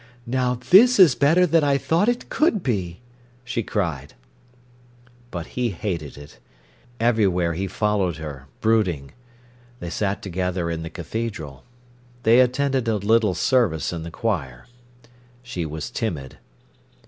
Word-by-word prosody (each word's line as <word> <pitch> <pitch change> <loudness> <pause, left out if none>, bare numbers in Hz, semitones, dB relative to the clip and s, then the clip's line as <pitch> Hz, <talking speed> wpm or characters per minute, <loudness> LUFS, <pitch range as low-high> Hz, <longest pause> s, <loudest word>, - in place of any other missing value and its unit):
"Now 125 0 0 0.2
this 240 +7 +8
is 180 -9 +7
better 160 +7 +4
than 165 -2 +3
I 140 -1 +3
thought 170 +10 +1
it 245 0 -2
could 265 - +1
be!" 95 -6 -2 0.4
she 125 -1 -2
cried. 85 - -3 1.1
But 85 -5 -5
he 125 -1 0
hated 85 -7 -4
it. 70 -3 -13 0.6
Everywhere 100 -7 +2
he 95 +4 -3
followed 95 -4 0
her, 70 -4 -8
brooding. 95 -11 +1 0.7
They 85 - -6
sat 100 +1 -2
together 90 -2 -2
in 80 -1 -3
the 80 - -6
cathedral. 85 - -6 0.6
They 115 +3 +6
attended 130 0 +1
a 110 - +2
little 105 -1 +2
service 110 - +1
in 85 - -4
the 85 - -6
choir. 75 - -3 0.8
She 90 -10 -4
was 75 0 -6
timid. 75 - -4
105 Hz, 135 wpm, -23 LUFS, 85-125 Hz, 1.1 s, this